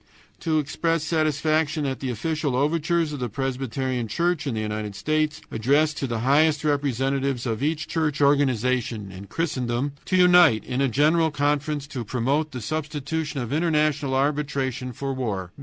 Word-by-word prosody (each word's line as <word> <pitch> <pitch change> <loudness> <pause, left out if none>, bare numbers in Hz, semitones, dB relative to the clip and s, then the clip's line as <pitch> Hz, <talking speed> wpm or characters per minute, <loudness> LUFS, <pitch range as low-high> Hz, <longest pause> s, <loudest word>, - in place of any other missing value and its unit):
To 160 -2 0
express 160 +2 0
satisfaction 155 -1 +1
at 135 -1 -2
the 135 - -3
official 150 +3 -1
overtures 160 +3 +1
of 145 - -5
the 125 -1 -2
Presbyterian 130 -1 -2
Church 170 - 0
in 125 - -1
the - - -2
United 105 -1 -3
States 155 +7 0
addressed 145 +7 +2
to 135 - -2
the 115 -2 -2
highest 145 +4 +3
representatives 135 -2 0
of 115 -1 -2
each 155 +1 -1
church 155 -3 -1
organization 125 -6 +1
in 95 +1 -10
Christendom 130 -4 -1
to 185 - +1
unite 180 - +6
in 130 +2 -2
a 135 - +3
general 155 +6 +3
conference 145 0 -1
to 130 -5 -4
promote 135 +7 0
the 125 - -6
substitution 150 +1 -3
of 120 +2 -4
international 150 -4 +1
arbitration 135 -3 -1
for 135 +3 -4
war. 100 -9 -3
140 Hz, 155 wpm, -24 LUFS, 125-155 Hz, -, unite